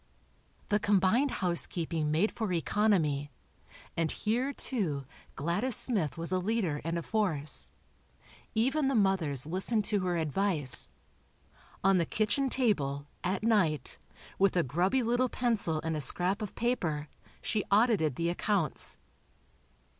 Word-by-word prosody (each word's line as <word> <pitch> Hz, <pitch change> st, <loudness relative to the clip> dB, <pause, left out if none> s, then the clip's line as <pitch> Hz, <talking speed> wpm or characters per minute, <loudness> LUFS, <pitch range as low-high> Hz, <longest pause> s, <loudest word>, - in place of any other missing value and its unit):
The 210 Hz, -, +2 dB
combined 205 Hz, +7 st, +3 dB
housekeeping 170 Hz, -5 st, 0 dB
made 165 Hz, +8 st, +2 dB
for 220 Hz, -4 st, -3 dB
economy, 165 Hz, -5 st, +1 dB, 0.7 s
and 165 Hz, -1 st, 0 dB
here, 240 Hz, -, -1 dB
too, 175 Hz, -, -2 dB, 0.3 s
Gladys 180 Hz, -, 0 dB
Smith 195 Hz, -, +1 dB
was 165 Hz, +1 st, -2 dB
a 185 Hz, -, +2 dB
leader 185 Hz, -6 st, -1 dB
and 165 Hz, +2 st, -2 dB
a 170 Hz, -, -3 dB
force. 160 Hz, -10 st, -1 dB, 0.9 s
Even 270 Hz, +6 st, +2 dB
the 270 Hz, -, +1 dB
mothers 185 Hz, -, +2 dB
listened 195 Hz, +6 st, 0 dB
to 210 Hz, -1 st, +1 dB
her 180 Hz, -2 st, -1 dB
advice. 160 Hz, -3 st, +2 dB, 0.9 s
On 195 Hz, -1 st, +4 dB
the 165 Hz, -, 0 dB
kitchen 240 Hz, +6 st, 0 dB
table, 145 Hz, -, 0 dB, 0.2 s
at 185 Hz, +3 st, -1 dB
night, 195 Hz, -10 st, +1 dB, 0.4 s
with 195 Hz, -1 st, +3 dB
a 175 Hz, -, +4 dB
grubby 180 Hz, -, +1 dB
little 245 Hz, +2 st, +1 dB
pencil 220 Hz, -12 st, 0 dB
and 160 Hz, 0 st, -1 dB
a 150 Hz, -, -2 dB
scrap 180 Hz, -, +1 dB
of 210 Hz, -, -5 dB
paper, 170 Hz, -11 st, -1 dB, 0.3 s
she 215 Hz, -3 st, -1 dB
audited 200 Hz, -, +3 dB
the 170 Hz, +3 st, 0 dB
accounts. 175 Hz, -3 st, 0 dB
185 Hz, 130 wpm, -30 LUFS, 160-220 Hz, 0.9 s, On